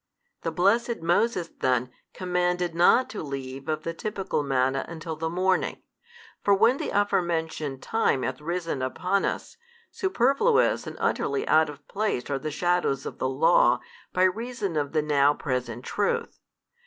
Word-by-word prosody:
The 165 Hz, -, -1 dB
blessed 220 Hz, +5 st, +1 dB
Moses 175 Hz, +1 st, +1 dB
then 125 Hz, -1 st, +1 dB, 0.2 s
commanded 180 Hz, -1 st, -1 dB
not 180 Hz, +9 st, +5 dB
to 215 Hz, -, -5 dB
leave 135 Hz, 0 st, -6 dB
of 155 Hz, -1 st, -1 dB
the 165 Hz, -, -3 dB
typical 195 Hz, -2 st, -2 dB
manna 135 Hz, -1 st, +1 dB
until 160 Hz, -1 st, -6 dB
the 160 Hz, +1 st, -3 dB
morning; 185 Hz, +2 st, 0 dB, 0.6 s
for 200 Hz, -, +5 dB
when 230 Hz, +6 st, +4 dB
the -, -, -3 dB
aforementioned 160 Hz, -8 st, -1 dB
time 220 Hz, -, +1 dB
hath -, -, -3 dB
risen 165 Hz, -3 st, -3 dB
upon 180 Hz, +9 st, 0 dB
us, -, -, -4 dB, 0.3 s
superfluous 380 Hz, -, +2 dB
and -, -, -7 dB
utterly 410 Hz, -, 0 dB
out 155 Hz, 0 st, +4 dB
of 150 Hz, -, -11 dB
place 200 Hz, -, -2 dB
are 140 Hz, -, 0 dB
the 155 Hz, -, -4 dB
shadows 155 Hz, -4 st, 0 dB
of -, -, -7 dB
the 130 Hz, -, 0 dB
Law -, -, +4 dB, 0.3 s
by 185 Hz, -, +2 dB
reason 205 Hz, -1 st, -1 dB
of 145 Hz, -1 st, -1 dB
the 155 Hz, -2 st, +2 dB
now 145 Hz, -1 st, +3 dB
present 125 Hz, -3 st, -3 dB
truth. 205 Hz, -1 st, -1 dB
170 Hz, 155 wpm, -26 LUFS, 145-200 Hz, 0.6 s, not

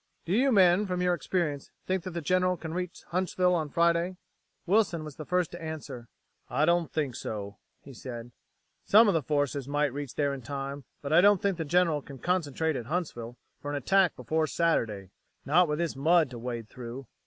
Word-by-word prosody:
Do 170 Hz, -, -1 dB
you 260 Hz, +6 st, +3 dB
men, 190 Hz, -1 st, +5 dB
from 180 Hz, -1 st, -1 dB
your 180 Hz, 0 st, +3 dB
experience, 155 Hz, -3 st, -2 dB, 0.2 s
think 185 Hz, 0 st, 0 dB
that 185 Hz, -2 st, -6 dB
the 170 Hz, -, -2 dB
General 185 Hz, +2 st, +2 dB
can 160 Hz, -1 st, -6 dB
reach 180 Hz, 0 st, -5 dB
Huntsville 180 Hz, 0 st, +1 dB
on 160 Hz, -4 st, 0 dB
Friday?" 170 Hz, +3 st, +1 dB, 0.5 s
Wilson 185 Hz, -4 st, +2 dB
was 150 Hz, -2 st, -8 dB
first 180 Hz, +2 st, -1 dB
to 175 Hz, -, -8 dB
answer. 145 Hz, -7 st, -7 dB, 0.4 s
"I 145 Hz, +5 st, +2 dB
don't 170 Hz, -1 st, +2 dB
think 145 Hz, -5 st, -1 dB
so," 100 Hz, -1 st, -6 dB, 0.2 s
he 140 Hz, -, -11 dB
said. 120 Hz, -1 st, -8 dB, 0.5 s
"Some 220 Hz, +3 st, +6 dB
of 200 Hz, -, +4 dB
the 165 Hz, -, +2 dB
forces 145 Hz, -1 st, -1 dB
might 145 Hz, -1 st, 0 dB
reach 140 Hz, -2 st, -6 dB
there 145 Hz, -1 st, +1 dB
in 135 Hz, -, -6 dB
time, 140 Hz, +1 st, -5 dB, 0.2 s
but 140 Hz, +2 st, -2 dB
I 170 Hz, -, +7 dB
don't 205 Hz, 0 st, +5 dB
think 195 Hz, -2 st, 0 dB
the 165 Hz, -, -1 dB
General 165 Hz, -1 st, +2 dB
can 140 Hz, 0 st, -11 dB
concentrate 160 Hz, -1 st, 0 dB
at 120 Hz, -3 st, -5 dB
Huntsville 125 Hz, -8 st, -4 dB, 0.2 s
for 145 Hz, -, -5 dB
an 145 Hz, -, -2 dB
attack 185 Hz, +5 st, +3 dB
before 155 Hz, +6 st, -1 dB
Saturday. 115 Hz, -, 0 dB, 0.3 s
Not 170 Hz, +5 st, +4 dB
with 150 Hz, 0 st, -1 dB
this 170 Hz, -3 st, -2 dB
mud 155 Hz, +1 st, +3 dB
to 120 Hz, -, -7 dB
wade 120 Hz, -2 st, -5 dB
through." 125 Hz, +3 st, -8 dB
155 Hz, 200 wpm, -28 LUFS, 135-180 Hz, 0.5 s, I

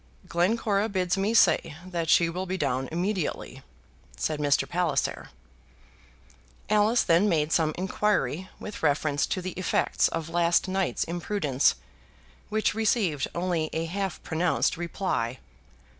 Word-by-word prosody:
"Glencora 200 Hz, +4 st, +1 dB
bids 185 Hz, -2 st, 0 dB
me 195 Hz, +2 st, 0 dB
say 165 Hz, -7 st, +4 dB
that 170 Hz, -3 st, -3 dB
she 170 Hz, -, +5 dB
will 180 Hz, +3 st, -4 dB
be 185 Hz, +1 st, -2 dB
down 130 Hz, -6 st, -1 dB
immediately," 180 Hz, +1 st, -3 dB, 0.6 s
said 150 Hz, -, -2 dB
Mr. 145 Hz, -1 st, +2 dB
Palliser. 170 Hz, -6 st, -1 dB, 1.4 s
Alice 215 Hz, +3 st, +4 dB
then 175 Hz, +5 st, +3 dB
made 155 Hz, -3 st, +1 dB
some 160 Hz, -2 st, +2 dB
inquiry 190 Hz, -1 st, 0 dB
with 210 Hz, -, -8 dB
reference 145 Hz, -1 st, +1 dB
to 185 Hz, -, -2 dB
the 185 Hz, -, -3 dB
effects 185 Hz, +1 st, +1 dB
of 165 Hz, -1 st, -4 dB
last 170 Hz, +2 st, +2 dB
night's 190 Hz, 0 st, 0 dB
imprudence, 170 Hz, -5 st, 0 dB, 0.7 s
which 215 Hz, 0 st, +1 dB
received 210 Hz, -, +1 dB
only 170 Hz, -3 st, -1 dB
a 165 Hz, +1 st, -1 dB
half 190 Hz, +1 st, -4 dB
pronounced 165 Hz, +2 st, +1 dB
reply. 165 Hz, -8 st, -2 dB
175 Hz, 130 wpm, -27 LUFS, 160-195 Hz, 1.4 s, she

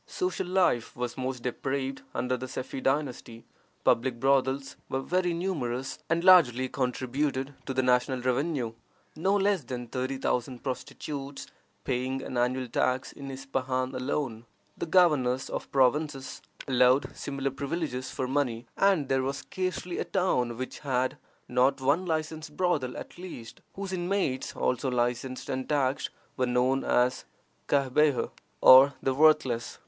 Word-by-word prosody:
Social 365 Hz, -, -2 dB
life 180 Hz, -11 st, +1 dB
was 125 Hz, -1 st, -3 dB
most 130 Hz, -2 st, -4 dB
depraved 135 Hz, +2 st, -2 dB
under 125 Hz, +2 st, 0 dB
the 130 Hz, +1 st, -5 dB
Sefi 130 Hz, +1 st, -5 dB
dynasty. 130 Hz, -5 st, -2 dB, 0.4 s
Public 120 Hz, 0 st, +2 dB
brothels 135 Hz, +1 st, +1 dB
were 130 Hz, -, -1 dB
very 180 Hz, +2 st, +1 dB
numerous, 135 Hz, -8 st, -2 dB
and 165 Hz, +1 st, +1 dB
largely 130 Hz, -9 st, +6 dB
contributed 130 Hz, +2 st, -1 dB
to 135 Hz, -, -2 dB
the 130 Hz, -, +2 dB
national 125 Hz, +1 st, +2 dB
revenue, 130 Hz, -1 st, 0 dB, 0.4 s
no 190 Hz, +6 st, +1 dB
less 200 Hz, -4 st, +2 dB
than 125 Hz, 0 st, -5 dB
thirty 130 Hz, +3 st, -3 dB
thousand 125 Hz, -1 st, -2 dB
prostitutes 140 Hz, +1 st, -5 dB, 0.4 s
paying 130 Hz, +1 st, -2 dB
an -, -, -6 dB
annual 125 Hz, +1 st, 0 dB
tax 130 Hz, +2 st, 0 dB
in 140 Hz, -1 st, -9 dB
Ispahan 130 Hz, -1 st, -2 dB
alone. 130 Hz, -3 st, -2 dB, 0.3 s
The -, -, -4 dB
governors 150 Hz, -8 st, +3 dB
of -, -, -5 dB
provinces 135 Hz, +1 st, +1 dB, 0.3 s
allowed 130 Hz, +1 st, +3 dB
similar 140 Hz, -1 st, -3 dB
privileges 140 Hz, -2 st, -3 dB
for 130 Hz, -1 st, -3 dB
money, 125 Hz, -4 st, -1 dB
and 195 Hz, -8 st, +3 dB
there 135 Hz, 0 st, +2 dB
was 135 Hz, +1 st, -2 dB
scarcely 185 Hz, -1 st, -3 dB
a -, -, +1 dB
town 125 Hz, -11 st, 0 dB
which 130 Hz, +1 st, -5 dB
had 130 Hz, -1 st, 0 dB, 0.3 s
not 125 Hz, +3 st, +2 dB
one 145 Hz, +8 st, +1 dB
licensed 155 Hz, -1 st, -3 dB
brothel 145 Hz, -9 st, 0 dB
at -, -, -9 dB
least, 170 Hz, -11 st, -9 dB
whose 195 Hz, -1 st, -5 dB
inmates 175 Hz, -7 st, -1 dB
(also 125 Hz, +1 st, 0 dB
licensed 125 Hz, +1 st, -1 dB
and 130 Hz, 0 st, -3 dB
taxed) 140 Hz, -2 st, +1 dB, 0.3 s
were 125 Hz, -, +1 dB
known 125 Hz, +2 st, +2 dB
as 125 Hz, +1 st, +2 dB, 0.4 s
Cahbeha, 140 Hz, 0 st, +2 dB, 0.3 s
or 135 Hz, +2 st, +9 dB
the 135 Hz, -, +2 dB
worthless. 135 Hz, -5 st, +3 dB
135 Hz, 140 wpm, -28 LUFS, 125-150 Hz, 0.4 s, or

